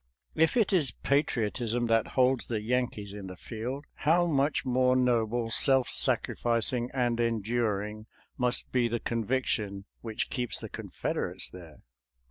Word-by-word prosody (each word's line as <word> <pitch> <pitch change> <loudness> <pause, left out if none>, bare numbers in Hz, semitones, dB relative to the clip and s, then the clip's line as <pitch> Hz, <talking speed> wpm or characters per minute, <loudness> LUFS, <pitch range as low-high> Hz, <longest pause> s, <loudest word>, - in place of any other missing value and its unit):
If 160 +9 +2
it 215 -4 +3
is 155 -8 +3
patriotism 120 -4 0
that 115 -1 +1
holds 130 0 +3
the 115 -2 -1
Yankees 110 -3 -2
in 100 -2 -7
the 90 - -8
field, 125 +8 -5
how 170 +4 +2
much 145 -3 +1
more 125 0 +3
noble, 120 -2 +1
self 135 +1 +3
sacrificing, 120 +1 +2
and 120 -3 0
enduring 110 -2 -1 0.3
must 125 0 0
be 125 -2 +2
the 120 0 -2
conviction 110 -4 -1
which 110 -2 -4
keeps 125 -4 -2
the - - -8
Confederates - - -4
there? 85 -4 -13
120 Hz, 135 wpm, -29 LUFS, 110-130 Hz, 0.3 s, it